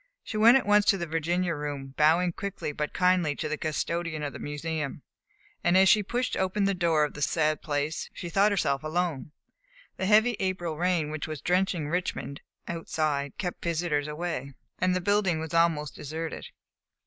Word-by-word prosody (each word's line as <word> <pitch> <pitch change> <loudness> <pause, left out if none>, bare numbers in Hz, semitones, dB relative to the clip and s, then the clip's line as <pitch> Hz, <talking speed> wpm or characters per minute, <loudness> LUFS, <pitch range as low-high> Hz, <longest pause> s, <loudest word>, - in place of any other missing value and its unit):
She - - -7
went 230 +4 +7
at 265 - -2
once 205 0 +4
to 195 - +4
the 170 - -3
Virginia 170 +2 0
Room, 145 -3 -5
bowing 165 +4 +4
quickly 200 -5 -4
but 150 +1 -3
kindly 180 -5 +2
to 155 - -3
the 155 - -1
custodian 155 +1 -2
of 145 -2 -3
the - - -8
Museum, 150 -1 -4 0.6
and 175 +1 +4
as 190 0 +6
she 210 - +6
pushed 240 +4 -2
open 190 +2 0
the 195 0 +2
door 170 -4 +2
of 150 - -1
the 150 - -8
sad 155 0 +1
place, 150 +1 -2
she 175 - -7
thought 200 +5 +3
herself 140 -8 +1
alone. 155 -2 -2 0.7
The 190 - -1
heavy 220 +2 +4
April 185 -4 -2
rain 170 -2 0
which 155 0 -4
was 155 -2 -5
drenching 180 -3 0
Richmond 170 -4 -3 0.3
outside 155 -4 -2
kept 180 -2 -4
visitors 165 -3 0
away, 150 -4 -4 0.2
and 185 0 +2
the 185 - 0
building 195 -3 +2
was 160 +1 -6
almost 165 -3 +2
deserted. 160 +3 -5
165 Hz, 180 wpm, -28 LUFS, 150-185 Hz, 0.7 s, went